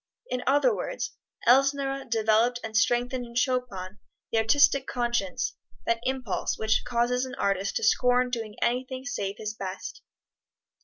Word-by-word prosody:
In 250 0 -1
other 290 - +4
words, - - -4 0.3
Elsner 275 +1 +3
developed 225 +2 +2
and 220 -1 -6
strengthened 245 +3 +2
in 235 0 -11
Chopin 245 -7 -1 0.3
the 225 - +2
artistic 275 +3 +4
conscience 240 -6 -1 0.3
that 230 0 +1
impulse 255 -6 -2
which 220 0 +1
causes 245 +1 +1
an 260 - -7
artist 195 0 0
to - - -1
scorn 250 +2 +3
doing 225 -3 -4
anything 255 +2 -1
save 200 -8 -3
his 215 -1 -4
best. 195 -2 -6
240 Hz, 140 wpm, -27 LUFS, 220-260 Hz, 0.3 s, other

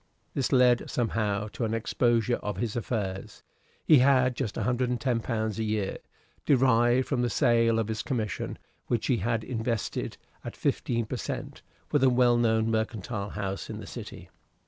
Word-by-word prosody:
This 135 - -1
led 125 -2 +4
somehow 105 -3 -1
to 120 - -5
an 110 0 0
exposure 120 +1 +1
of 105 - -5
his 115 -3 -2
affairs. 105 -5 -4 0.4
He 150 - +7
had 130 -1 +4
just 110 - -3
£110 120 -3 -1
a - - 0
year, 105 -3 -1 0.5
derived 125 -2 +3
from 130 -4 0
the 120 - +1
sale 115 -3 +3
of 115 -2 0
his 110 -1 -2
commission, 110 - -3 0.3
which 115 -2 0
he 125 - +2
had 115 +2 -1
invested, 115 -3 -3 0.3
at - - -7
fifteen 115 -2 0
per - - -4
cent, - - -5 0.3
with 145 -3 +2
a 130 - +6
well 125 -1 +4
known 110 -1 +2
mercantile 110 -2 -2
house 100 -2 -4
in - - -5
the - - -8
City. - - -9
115 Hz, 160 wpm, -28 LUFS, 110-125 Hz, 0.5 s, He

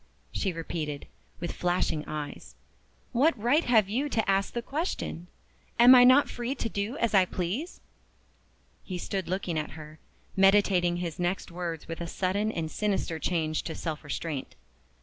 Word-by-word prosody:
she 190 - -1
repeated, 160 -3 -4 0.3
with 175 - -3
flashing 175 -3 0
eyes. 150 -1 -6 0.6
"What 265 +3 +3
right 260 +9 +3
have 220 -5 +4
you 260 +8 -1
to 225 -5 0
ask 195 0 +2
the 235 - -3
question? 275 - -3 0.5
Am 245 +2 +9
I 250 -1 +9
not 255 +3 +7
free 245 +3 -3
to 240 - -2
do 215 +5 -3
as 235 -2 0
I 190 -2 +6
please?" 190 - -4 1.0
He 185 - -5
stood 190 +1 -3
looking 180 -3 -1
at 150 - -5
her, 155 0 -11 0.4
meditating 195 -3 +4
his 175 -2 -4
next 175 +1 -1
words 170 -2 -5
with 165 +1 -6
a 170 - -3
sudden 200 +5 0
and 160 -5 -3
sinister 195 -6 -1
change 155 -3 0
to 160 - -6
self 160 -2 -4
restraint. 145 -1 -4
185 Hz, 160 wpm, -28 LUFS, 165-230 Hz, 1.0 s, Am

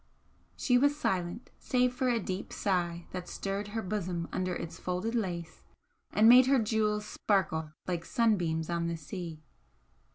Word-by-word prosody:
She 245 -2 +3
was 285 +2 +3
silent, 185 -3 -2
save 250 -1 +2
for 255 0 0
a 235 -1 +2
deep 190 -1 -4
sigh 175 -3 -1
that 180 -1 -6
stirred 200 +1 -3
her 220 +2 -3
bosom 180 -4 -2
under 185 -1 -1
its 165 - -6
folded 180 +5 -2
lace 175 -8 -3 0.5
and 215 +1 +5
made 250 +2 +9
her 275 0 +5
jewels 215 -2 +1
sparkle 165 -8 0
like 175 -2 -1
sunbeams 175 -8 +1
on 170 -1 -1
the 170 0 -2
sea. 165 -1 -7
190 Hz, 155 wpm, -31 LUFS, 170-225 Hz, 0.5 s, made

